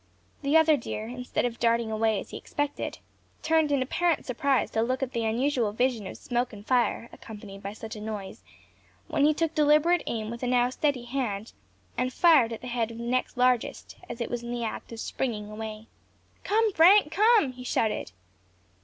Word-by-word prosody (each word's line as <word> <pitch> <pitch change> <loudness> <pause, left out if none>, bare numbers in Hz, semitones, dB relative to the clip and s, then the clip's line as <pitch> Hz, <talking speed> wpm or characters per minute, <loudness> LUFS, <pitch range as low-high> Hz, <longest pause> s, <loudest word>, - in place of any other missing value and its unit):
The 285 +3 +3
other 320 -1 +5
deer, 220 -3 -5
instead 250 +1 -3
of 235 -1 -3
darting 230 -1 +1
away, 220 -1 +1
as - - -9
he - - -5
expected, 290 0 -3 0.5
turned 315 -2 +2
in 275 -2 +2
apparent 335 +4 0
surprise 270 +1 0
to 220 - 0
look 255 +3 0
at 260 - -3
the 230 -2 -2
unusual 235 -1 0
vision 235 -3 0
of - - -8
smoke 245 +1 -2
and 205 0 -11
fire, 245 -2 +1
accompanied 205 -3 -10
by 200 0 -6
such 220 +1 -8
a 210 - -8
noise, 210 -3 -6 0.7
when 285 - +2
he 305 - +4
took 325 0 0
deliberate 305 +3 +4
aim 220 -1 -3
with 235 - -7
a 250 - -1
now 245 0 +2
steady 275 -2 0
hand, 235 -5 -3 0.5
and 255 - 0
fired 300 -8 +5
at 230 - -6
the - - -9
head 235 -2 -1
of 230 - -9
the 235 - -6
next 250 +1 -1
largest, 250 -1 +1
as 235 - -6
it 235 - -3
was 240 -1 -2
in 235 - -8
the 240 -1 -3
act 225 - -5
of 230 - -7
springing 215 -4 -3
away. 215 0 -7 0.6
"Come, 440 0 +2
Frank! 350 0 +6
come!" 420 - +4
he 250 0 -10
shouted. 220 - -1
245 Hz, 200 wpm, -27 LUFS, 225-285 Hz, 0.7 s, Frank